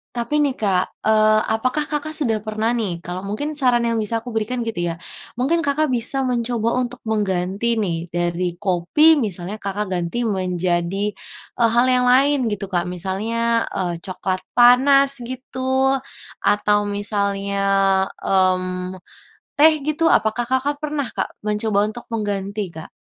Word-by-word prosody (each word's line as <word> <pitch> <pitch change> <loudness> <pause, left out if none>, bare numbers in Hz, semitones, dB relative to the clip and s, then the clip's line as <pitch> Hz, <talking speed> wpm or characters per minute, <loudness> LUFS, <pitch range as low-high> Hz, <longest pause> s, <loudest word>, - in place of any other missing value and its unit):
Tapi 245 +6 0
nih 280 -3 +1
Kak, 190 -4 -1
eee, 215 0 +4
apakah 255 +6 -1
Kakak 300 +1 -3
sudah 225 -8 0
pernah 215 +2 -1
nih, 205 -7 -2
kalau 180 +1 -5
mungkin 215 +10 -4
saran 250 -4 +2
yang 230 - 0
bisa 225 +2 -1
aku 245 - -7
berikan 225 +3 -2
gitu 175 -7 -2
ya, - - -6 0.4
mungkin 325 +7 +1
Kakak 285 +2 +1
bisa 255 +3 0
mencoba 235 -2 -1
untuk 250 0 -4
mengganti 205 +2 -1
nih 170 -4 -2
dari 175 0 -2
kopi 200 - +3
misalnya, 195 -2 -3
Kakak 200 +1 -3
ganti 180 +7 -2
menjadi, 185 +1 -1 0.5
eee, 230 - +5
hal 240 +1 +4
yang 250 -1 +2
lain 275 +3 +4
gitu 205 -1 -3
Kak. 175 -1 0
Misalnya, 225 +6 -1
eee, 175 -2 -2
coklat 185 0 -3 0.2
panas 270 +2 +6
gitu, 260 +1 -1 0.5
atau 205 0 +2
misalnya, 200 -1 0 0.6
mmm, 185 -1 0 0.6
teh 315 +2 +7
gitu, 305 +2 +2
apakah 220 +2 +2
Kakak 260 +3 0
pernah 295 -2 -2
Kak, - - -4
mencoba 210 -1 +1
untuk 240 +2 -10
mengganti 205 -2 -3
Kak? 160 0 -9
215 Hz, 145 wpm, -21 LUFS, 190-250 Hz, 0.6 s, teh